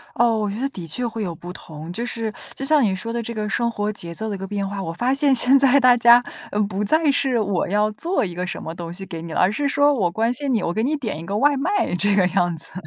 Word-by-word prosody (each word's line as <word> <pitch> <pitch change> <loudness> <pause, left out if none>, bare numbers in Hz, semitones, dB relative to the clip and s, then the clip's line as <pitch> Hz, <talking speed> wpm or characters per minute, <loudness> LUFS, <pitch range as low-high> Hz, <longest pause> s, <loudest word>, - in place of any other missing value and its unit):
哦， 235 -1 +3
我 210 -1 -1
觉 205 +3 -5
得 270 - 0
的 180 -10 -8
确 245 +10 -1
会 225 -1 -5
有 175 -4 -4
不 175 +3 -9
同。 160 -1 -10
就 235 +6 -3
是， 225 -2 -4 0.2
就 270 - -5
像 300 +1 +4
你 195 -4 +1
说 230 +5 -5
的 235 - -2
这 235 +1 -6
个 215 -1 -3
生 235 +2 0
活 210 -2 -2
节 170 -4 -7
奏 220 +5 -3
的 205 - -3
一 - - -6
个 195 - -6
变 200 0 -3
化， 200 0 -5
我 165 - -4
发 240 +10 0
现 280 0 +3
现 255 +3 +6
在 275 0 +5
大 250 -2 +6
家， 240 +1 +6 0.3
嗯， 205 0 0
不 200 0 -3
再 310 +7 +3
是 270 -3 0
我 200 -4 -1
要 210 +2 +1
做 330 - -1
一 180 - -6
个 180 +1 -4
什 - - -5
么 160 - -6
东 170 -1 -7
西 190 +3 -6
给 170 -4 -7
你 165 0 -8
了， - - -1
而 185 - +4
是 285 +6 -1
说 285 +1 +3
我 190 -10 0
关 225 +5 0
心 275 +1 -2
你， 220 -5 0
我 170 - -1
给 220 - -1
你 290 +5 0
点 220 - -4
一 165 - -8
个 200 +3 -2
外 285 +4 +3
卖 370 - 0
这 205 +3 +2
个 190 -2 +4
样 175 -2 0
子。 165 - 0
215 Hz, 325 characters per minute, -21 LUFS, 185-250 Hz, 0.3 s, 现